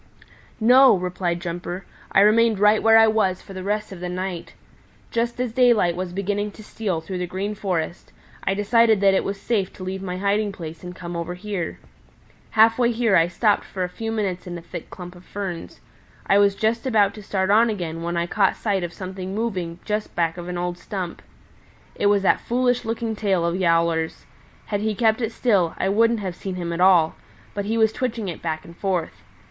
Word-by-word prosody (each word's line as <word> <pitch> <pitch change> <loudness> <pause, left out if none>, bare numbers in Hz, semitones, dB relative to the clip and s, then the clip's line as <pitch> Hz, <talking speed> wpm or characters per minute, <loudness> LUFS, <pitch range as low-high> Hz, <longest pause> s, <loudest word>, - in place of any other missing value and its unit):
"No," 250 +2 +7
replied 180 -1 -2
Jumper. 175 +1 -5 0.3
"I 195 - +5
remained 220 +1 +4
right 210 +2 +4
where 225 0 +6
I 225 - +8
was 215 -4 +1
for 195 - -11
the 190 - -6
rest 210 +2 -2
of 190 - -8
the 180 0 -4
night. 180 -1 -5 0.6
Just 235 +1 -1
as 250 -2 -1
daylight 230 -8 +3
was 180 0 -4
beginning 205 +2 -2
to 215 - -12
steal 195 -6 -3
through 185 +2 -5
the 180 - -2
Green 195 +4 -3
Forest, 180 -5 -3 0.3
I 195 - 0
decided 220 +1 +4
that 195 -1 +5
it 190 - +2
was 195 0 -4
safe 200 -5 -1
to 185 - -9
leave 190 +1 -4
my 180 -1 -4
hiding 200 +2 +1
place 165 -2 -8
and 180 0 -8
come 175 -1 -7
over 170 +1 -4
here. 185 -3 -4 0.7
Half 225 +2 +4
way 240 -1 +3
here 230 -3 +2
I 165 0 +5
stopped 205 +3 +1
for 185 - -4
a 180 - -2
few 225 +5 -5
minutes 195 -5 -2
in 175 -1 -5
a - - -9
thick - - -8
clump 180 -1 -9
of 175 - -15
ferns. 190 -5 -6 0.4
I 200 - +4
was 200 -1 +4
just 225 +4 0
about 205 -5 +3
to 210 - -10
start 190 -1 -1
on 230 +3 +5
again 170 -6 -4
when 170 +1 -2
I 170 - +1
caught 195 +2 +2
sight 200 -4 -1
of 175 0 -4
something 190 0 -6
moving 185 -7 -2
just 210 0 -3
back 165 -1 +1
of 175 -1 -7
an 180 - -3
old 175 0 -3
stump. 185 -4 -5 0.7
It 205 - 0
was 205 -1 +3
that - - +3
foolish 245 0 0
looking 225 0 -2
tail 195 -5 +1
of 170 +1 0
Yowler's. 165 -2 +1 0.4
Had 205 -1 -2
he 215 0 -1
kept 220 +2 +2
it 225 -1 -1
still 200 -9 +1
I 190 - 0
wouldn't 230 +2 +3
have 185 -3 -4
seen 190 0 -5
him 170 -2 -3
at 170 - -3
all; 180 -4 +5 0.4
but 205 -1 -3
he 225 +2 -1
was 220 -1 +3
twitching 230 -5 -2
it 170 - -7
back 155 -2 -3
and 170 - -12
forth. 180 -3 -2
195 Hz, 215 wpm, -23 LUFS, 180-220 Hz, 0.7 s, I